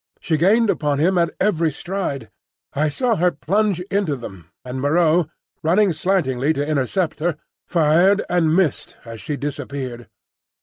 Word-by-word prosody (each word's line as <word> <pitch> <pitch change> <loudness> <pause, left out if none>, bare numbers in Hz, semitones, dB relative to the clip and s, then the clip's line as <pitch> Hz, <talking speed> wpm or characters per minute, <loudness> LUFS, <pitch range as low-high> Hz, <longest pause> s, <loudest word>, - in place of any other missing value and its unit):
She 160 - -1
gained 205 +7 +3
upon 145 -2 -1
him 175 +6 +2
at 170 - +2
every 165 -5 +1
stride. 145 - -4 0.4
I 150 +2 +1
saw 235 - 0
her 180 +2 +3
plunge 180 +6 0
into 195 -7 0
them, 95 - -10 0.2
and 130 +1 -5
Moreau, 160 +2 +2 0.3
running 185 +4 +3
slantingly 155 -6 0
to 145 -1 -2
intercept 155 +5 -1
her, 165 -1 -1 0.3
fired 175 +5 +3
and 165 -3 +2
missed 180 -7 0
as 115 -1 -9
she 150 -3 -4
disappeared. 135 -4 -5
160 Hz, 145 wpm, -21 LUFS, 140-185 Hz, 0.4 s, gained